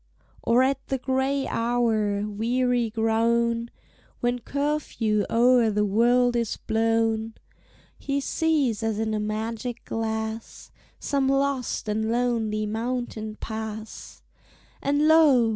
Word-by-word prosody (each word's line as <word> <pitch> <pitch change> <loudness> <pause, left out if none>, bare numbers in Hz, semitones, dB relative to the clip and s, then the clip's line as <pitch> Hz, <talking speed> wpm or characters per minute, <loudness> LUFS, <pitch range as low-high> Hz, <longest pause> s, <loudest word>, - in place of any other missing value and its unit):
Or 240 +2 +3
at 270 +1 -1
the 270 - -1
gray 265 +2 0
hour, 220 -3 0
weary 240 +3 0
grown, 230 +1 +1 0.5
When 245 0 0
curfew 255 -6 -1
o'er 240 0 +4
the 210 0 +1
wold 240 +4 +3
is 235 -2 -1
blown, 225 0 0 0.6
He 280 0 -1
sees, 280 -6 0
as 225 -2 -1
in 220 0 -1
a 215 - 0
magic 220 +3 -4
glass, 220 0 -4 0.3
Some 275 -2 0
lost 275 -4 0
and 220 +1 -1
lonely 230 -3 0
mountain 220 -1 -3
pass; 220 0 -7 0.6
And 290 +2 +2
lo! 295 -8 +5
230 Hz, 110 wpm, -25 LUFS, 220-255 Hz, 0.6 s, lo